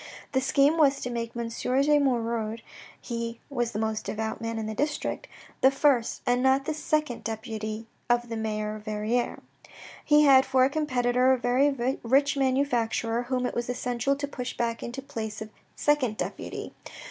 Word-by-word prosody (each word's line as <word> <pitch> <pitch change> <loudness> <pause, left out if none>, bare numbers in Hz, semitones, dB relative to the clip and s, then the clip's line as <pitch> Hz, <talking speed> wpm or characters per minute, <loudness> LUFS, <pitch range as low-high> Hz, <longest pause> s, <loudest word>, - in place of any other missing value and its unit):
The 260 - +1
scheme 280 +4 +3
was 280 -3 +4
to 250 - -3
make 230 -1 -4
M. 235 -1 -2
de 275 +5 +2
Moirod 230 -4 -1 0.4
(he 230 -1 -4
was 240 -3 -1
the 210 - -4
most 220 0 -1
devout 220 +2 -3
man 230 0 -3
in 220 - -3
the 215 - -3
district) 295 - -2 0.3
the 265 - +7
first 270 -4 +1
and 245 0 +2
not 265 +1 +3
the 315 - -1
second 305 -5 -1
deputy 220 0 -4 0.2
of 240 0 +2
the 230 - -4
mayor 215 -1 -2
of 210 - -14
Verrieres. 215 +3 -1 0.6
He 300 0 +5
had 270 -2 +7
for 265 -1 +3
a 270 - 0
competitor 255 -4 +2
a - - +2
very 255 +1 +1
rich 275 +5 +3
manufacturer 245 -4 +1
whom 250 0 -1
it - - -2
was 240 0 -3
essential 250 +2 0
to 285 +1 -4
push 250 -3 -6
back 230 -1 -1
into 245 +3 -5
the 275 - -24
place 220 -6 -5
of 220 0 -7 0.3
second 265 -7 +1
deputy. - - -5
245 Hz, 180 wpm, -27 LUFS, 230-275 Hz, 0.6 s, the